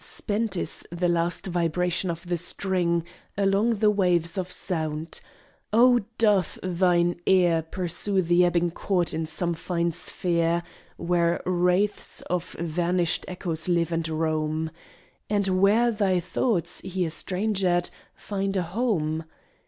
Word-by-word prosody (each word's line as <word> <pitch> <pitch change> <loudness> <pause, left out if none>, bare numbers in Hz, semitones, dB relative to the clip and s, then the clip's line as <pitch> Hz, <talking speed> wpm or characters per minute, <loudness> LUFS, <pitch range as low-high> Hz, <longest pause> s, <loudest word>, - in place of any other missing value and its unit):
Spent 210 -2 -2
is - - -3
the 175 +1 0
last 170 0 0
vibration 180 +1 0
of 170 +1 -5
the 175 - 0
string 175 -1 0 0.3
Along 200 +4 +2
the 210 0 +3
waves 180 -4 +2
of 185 -2 -2
sound. 160 -3 -3 0.5
Oh, 245 +3 +6 0.2
doth 205 -5 +2
thine 175 -1 +2
ear 175 -3 +4
Pursue 185 +3 0
the 175 +1 +4
ebbing 175 -1 +2
chord 175 0 0
in 160 0 -2
some 170 +2 -2
fine 170 0 -1
sphere, 170 +1 0 0.3
Where 170 0 +1
wraiths 180 +3 +1
of 180 -1 -3
vanished 170 +1 -1
echoes 175 -2 -2
live 170 -1 +1
and 165 -1 -1
roam, 155 0 -1 0.6
And 195 -3 +1
where 225 +5 +4
thy 200 -4 +1
thoughts, 180 0 -1
here 185 -3 -2
strangered, 185 -1 0 0.2
find 195 -1 -3
a 180 - +1
home? 165 -5 -1
175 Hz, 130 wpm, -26 LUFS, 170-190 Hz, 0.6 s, Oh